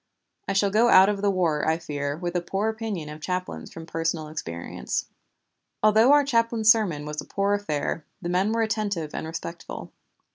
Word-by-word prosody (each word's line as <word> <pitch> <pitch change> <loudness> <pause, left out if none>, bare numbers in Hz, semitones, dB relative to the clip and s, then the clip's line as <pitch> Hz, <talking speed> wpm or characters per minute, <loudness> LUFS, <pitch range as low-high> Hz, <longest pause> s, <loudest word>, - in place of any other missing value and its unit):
I 195 - 0
shall 195 0 +2
go 225 +4 +4
out 190 -1 +8
of 200 -1 -1
the 205 - +2
war, 170 -6 +1
I 160 0 +3
fear, 145 -3 -4
with 175 +1 -4
a 175 - +1
poor 195 +5 -1
opinion 220 -8 -4
of 150 +1 -9
chaplains 185 +2 -4
from 165 - -9
personal 165 -1 -2
experience. 85 - -4 0.8
Although 220 +4 +6
our 290 0 +6
chaplain's 230 -4 +4
sermon 180 -10 +1
was 150 0 -4
a - - -9
poor 200 0 0
affair, 165 -5 -2 0.2
the 180 - -5
men 185 +4 +1
were 230 0 +1
attentive 205 -8 -2
and - - -4
respectful. 170 +1 -7
185 Hz, 185 wpm, -25 LUFS, 160-215 Hz, 0.8 s, out